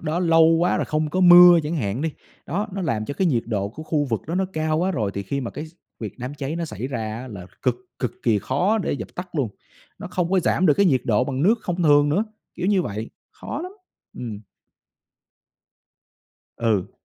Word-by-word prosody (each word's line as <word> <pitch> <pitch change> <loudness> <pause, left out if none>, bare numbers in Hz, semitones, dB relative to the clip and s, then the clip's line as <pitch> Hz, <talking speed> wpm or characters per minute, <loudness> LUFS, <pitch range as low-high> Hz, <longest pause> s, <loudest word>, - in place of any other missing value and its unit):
đó 160 +2 -2
lâu 165 -2 +5
quá 165 +2 +3
rồi - - 0
không 155 0 -1
có 185 - 0
mưa 175 -1 +9
chẳng 160 +3 -2
hạn 110 0 -2
đi. 160 - 0 0.4
Đó, 200 +7 -2
nó 195 0 -3
làm 110 -10 -1
cho 145 - -5
cái 190 - +1
nhiệt 120 -8 +1
độ 100 -3 -1
của 155 +9 -9
khu 155 -2 0
vực 115 -5 -2
đó 165 - -3
nó 190 - +1
cao 155 -1 0
quá 185 +2 +1
rồi 110 - -1
thì 100 - -3
khi 140 +9 -3
mà 120 - -4
cái 150 - -6
x 155 - -17 0.3
việc 110 +1 -6
đám 125 +4 -5
cháy 145 +3 -4
nó 170 - -2
xảy 140 -5 -5
ra 115 -4 -4
á, 130 - -8
là 95 -5 -9 0.2
cực 125 -2 +1 0.2
cực 125 - -2
kỳ 110 -3 +3
khó 180 - +1
để 190 - -1
dập 120 -6 -5
tắt 180 0 -6
luôn, 140 -8 0 0.5
nó - - -7
không 180 -1 -2
có 190 -1 +3
giảm 185 +2 +2
được 150 - +5
cái 200 - +3
nhiệt 135 -7 +3
độ 115 +2 +2
bằng 135 +1 -2
nước 210 +6 +5
không 175 0 -2
thường 145 -1 +5
nữa, 190 +9 +1 0.3
kiểu 180 - -3
như 195 -2 +3
vậy, 105 -1 -5 0.2
khó 280 - -6
lắm. 365 - -7 0.5
Ừm. 110 -4 -6 2.2
Ừ. 110 -5 0
150 Hz, 230 wpm, -23 LUFS, 120-175 Hz, 2.2 s, mưa